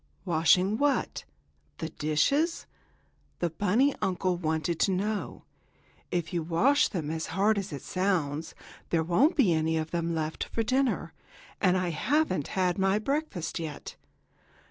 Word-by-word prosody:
"Washing 180 +4 +3
what; 290 -1 0 0.5
the 160 - -4
dishes?" 165 - +1 0.7
the 175 -2 -1
bunny 210 - +2
uncle 185 -1 0
wanted 160 0 -1
to 195 - +3
know. 205 +3 -2 0.7
"If 175 0 -2
you 170 - 0
wash 215 - +3
them 155 -6 -4
as 160 0 -3
hard 200 +4 +2
as 195 -1 -6
it 140 -3 -6
sounds, 165 -5 -1 0.3
there 165 -1 +2
won't 220 - +3
be 215 - +4
any 160 0 +1
of 160 0 -3
them 170 -1 -1
left 155 0 -2
for 225 - -2
dinner, 245 -9 0 0.5
and 185 -1 +4
I 180 -1 0
haven't 210 - 0
had 180 0 +1
my 195 +1 +3
breakfast 245 - -2
yet." 160 -3 -6
180 Hz, 145 wpm, -28 LUFS, 160-215 Hz, 0.7 s, be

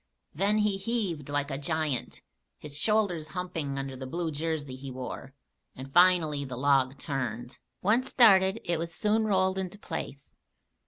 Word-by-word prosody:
Then 200 +6 +2
he 210 -2 +2
heaved 195 - -2
like 145 0 -1
a 135 - -3
giant, 155 -4 -2 0.4
his 150 -1 -6
shoulders 180 -2 +1
humping 165 -6 -3
under 135 -1 -4
the 130 0 -7
blue 165 +3 -2
jersey 150 -3 -3
he 135 +1 -8
wore, 130 +1 -7 0.4
and 135 +1 -9
finally 175 -5 +5
the 130 -3 -6
log 135 0 +2
turned. 125 -4 -4 0.2
Once 235 +7 +2
started, 195 -3 +5
it 170 -2 -1
was 165 0 -4
soon 220 +1 +1
rolled 190 -2 +2
into 190 +1 -5
place. 160 -7 -7
160 Hz, 155 wpm, -28 LUFS, 135-190 Hz, 0.4 s, finally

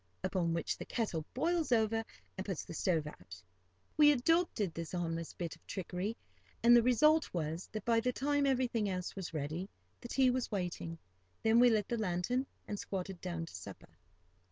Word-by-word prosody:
Upon 175 -3 0
which 165 - -2
the - - -4
kettle 190 -9 -2
boils 325 +1 +1
over, 225 -1 +3 0.3
and 190 - -4
puts 190 -5 -4
the - - -8
stove 165 -2 +1
out. 90 - -10 0.6
We 295 -1 +8
adopted 270 - +2
this 165 +1 -6
harmless 165 -2 -2
bit 170 -2 -4
of - - -27
trickery, 190 +3 -3 0.5
and 240 +1 +8
the 240 - +8
result 305 +7 +4
was 160 +1 -3
that, 215 -2 -5
by 230 -1 +4
the 250 +2 +1
time 285 +2 +1
everything 245 -5 +1
else 180 -1 -3
was 190 -3 -5
ready, 160 +5 -3 0.3
the - - -8
tea 255 +1 +3
was 255 0 -1
waiting. 175 -4 -3 0.5
Then 225 +1 +5
we 245 0 +8
lit 215 -3 +2
the 235 - -1
lantern, 215 +7 0 0.2
and 205 - -4
squatted 190 -2 -4
down 170 -2 -3
to - - -13
supper. - - -9
205 Hz, 180 wpm, -34 LUFS, 175-245 Hz, 0.6 s, We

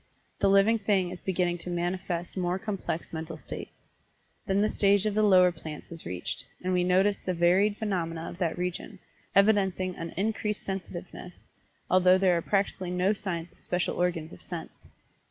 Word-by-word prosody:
The 195 - +3
living 200 +3 +5
thing 195 -4 +1
is 180 - -8
beginning 175 -2 0
to 180 - -6
manifest 175 0 -2
more 180 -1 0
complex 190 -5 -4
mental 160 0 -5
states. - - -9 0.6
Then 195 0 +2
the 210 - +3
stage 200 0 +3
of 215 - +1
the 215 - +2
lower 185 -3 +6
plants 160 -2 -9
is 165 -1 -6
reached, 90 +8 -4 0.2
and 185 0 0
we 180 -1 +3
notice 190 +3 +3
the 185 - -3
varied 185 +5 +3
phenomena 170 -6 -2
of 175 - -8
that 170 -3 0
region, 180 +3 -4 0.4
evidencing 190 -3 +3
an 165 0 -5
increased 210 +1 -1
sensitiveness, 180 -2 -7 0.4
although 185 0 +5
there 185 -2 +3
are 170 - +1
practically 195 -1 0
no 180 +3 +2
signs 175 -5 -4
of - - -25
special 180 0 -1
organs 170 -3 -1
of 90 - -13
sense. - - -7
185 Hz, 170 wpm, -28 LUFS, 175-195 Hz, 0.6 s, lower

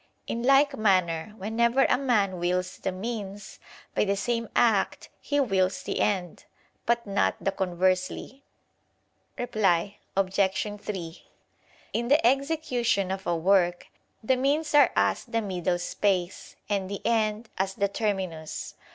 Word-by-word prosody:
In 235 - -3
like 275 +3 +4
manner 185 -3 +1
whenever 235 +6 +2
a - - +3
man 210 -9 +1
wills 180 +1 -1
the 190 - -2
means, 200 0 -6 0.3
by - - +2
the 200 -1 +1
same 230 +2 -2
act 215 -5 +2
he 290 -1 -1
wills 195 -8 +1
the - - -3
end; 185 -5 -1 0.4
but 235 0 +1
not 200 0 +1
the 195 - 0
conversely. 185 +8 -1 0.9
Reply 200 -5 +1 0.2
Obj. 195 +2 0
3: 175 -5 -6 0.7
In 235 +1 -1
the 285 -2 +4
execution 255 - +1
of 190 0 -4
a 175 - +1
work, 175 0 +2 0.3
the 260 +4 +3
means 290 +4 0
are 295 -1 +6
as - - +2
the 230 - -1
middle 180 -4 -1
space, 180 0 -1
and 195 -2 -1
the 200 - -6
end, 220 -1 0
as 190 0 -1
the 200 - +1
terminus. 190 -7 -3
200 Hz, 135 wpm, -27 LUFS, 185-235 Hz, 0.9 s, are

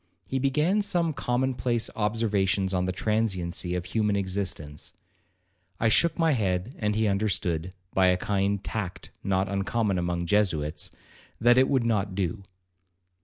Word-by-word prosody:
He 130 +7 -2
began 150 +10 +2
some 175 -5 +1
common 130 0 0
place 120 -2 0
observations 105 -3 +1
on 90 0 +1
the 95 - 0
transiency 95 -4 -1
of 90 -1 -3
human 105 +1 0
existence. 95 -6 -3 0.9
I 115 - +3
shook 165 +7 +3
my 165 -1 +3
head, 100 -2 0
and 105 -1 0
he 110 +1 +2
understood, 95 -4 0 0.2
by 95 -1 +4
a 90 0 +4
kind 100 +1 0
of 100 - -16
tact 105 -5 -5
not 95 0 +1
uncommon 100 0 0
among 85 0 -1
Jesuits, 85 -6 +1 0.5
that 120 +2 +5
it 130 - +4
would 130 -4 +2
not 100 -4 0
do. 95 +1 -2
100 Hz, 150 wpm, -27 LUFS, 95-115 Hz, 0.9 s, that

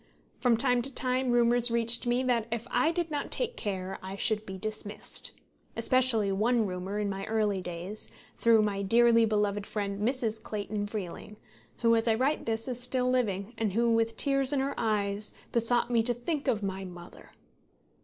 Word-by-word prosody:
From 240 -3 +3
time 245 0 +3
to 270 +3 -2
time 255 0 0
rumours 240 0 +4
reached 235 +1 +6
me 245 +2 +1
that 240 -3 0
if 235 0 -3
I 315 - +2
did 335 -1 -3
not 290 -1 -3
take 485 -1 -1
care 190 -2 -4
I 190 +1 -7
should 215 +1 0
be 190 0 -6
dismissed; 215 +1 -4 0.4
especially 230 -3 +3
one 225 +3 +1
rumour 185 +1 -4
in 210 -1 -1
my 195 0 -4
early 210 -3 0
days, 180 +4 -4 0.3
through 225 -2 +4
my 200 -1 -1
dearly 230 +3 +4
beloved 205 -1 -1
friend 200 -1 -3
Mrs. 225 -2 0
Clayton 205 0 -4
Freeling, 205 0 -7 0.4
who, 230 -1 +4
as 225 +1 0
I 225 - +3
write 265 +4 -1
this, 225 +1 -1
is 250 -2 -3
still 250 0 0
living, 215 -4 -1
and 215 -4 -1
who, 235 +2 +2
with 225 0 0
tears 275 -1 +1
in 285 - +1
her 275 +1 -1
eyes, 210 -2 -1 0.2
besought 240 +1 +2
me 235 -1 +3
to 240 +1 -1
think 290 +5 -4
of 210 -3 0
my 195 0 -3
mother. 175 -2 -12
225 Hz, 185 wpm, -29 LUFS, 205-245 Hz, 0.4 s, reached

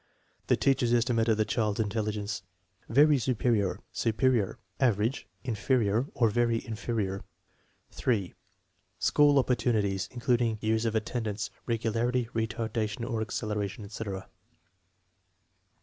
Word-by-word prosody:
The - - +3
teacher's 130 -3 +2
estimate 115 -1 +2
of 110 -2 +3
the 110 - +2
child's 105 -1 0
intelligence 105 -1 -2 0.5
(very 145 +3 +5
su 125 +1 0
perior, 110 -5 +1
superior, 115 -2 +1 0.2
average, 115 0 +1 0.2
inferior, 120 -1 +1
or 115 -3 +3
very 115 0 +1
inferior). 110 -3 -2 0.7
3. 105 -8 -1 0.6
School 145 -1 +4
opportunities, 110 -7 +1
including 120 -2 +1
years 110 +1 +1
of 115 -1 0
attendance, 110 -1 -2 0.2
regu 115 -1 0
larity, 120 +1 +1
retardation 110 0 -2
or 115 -3 -1
acceleration, 105 -2 -3
etc. 100 -2 -5
4. - - -20
115 Hz, 115 wpm, -29 LUFS, 105-120 Hz, 0.7 s, very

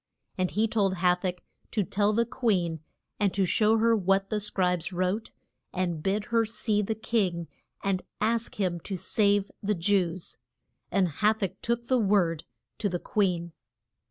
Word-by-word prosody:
And 185 -1 0
he 220 +2 +1
told 200 -4 +1
Ha 180 0 +4
tach 180 0 -4 0.3
to 210 - 0
tell 205 +3 +1
the 230 +2 +2
queen, 190 -10 0 0.4
and 205 -2 +2
to 195 -1 +3
show 215 +4 +3
her 230 +1 +4
what 195 -1 +1
the 215 - +1
scribes 180 -4 0
wrote, 185 +4 -1 0.4
and 175 -4 -2
bid 200 +4 0
her 230 -1 +5
see 215 -1 0
the 220 +2 -2
king 190 -7 0 0.4
and 195 -2 0 0.2
ask 230 +2 0
him 180 -3 0
to 190 +3 -5
save 200 +1 +1
the 210 +1 0
Jews. 180 -1 0 0.5
And 195 -2 +3
Ha 210 +7 +2
tach 195 -5 -2
took 235 0 -1
the 255 0 +2
word 190 -7 +2 0.3
to 205 - 0
the 175 - -1
queen. 175 -4 0
195 Hz, 165 wpm, -28 LUFS, 180-215 Hz, 0.5 s, her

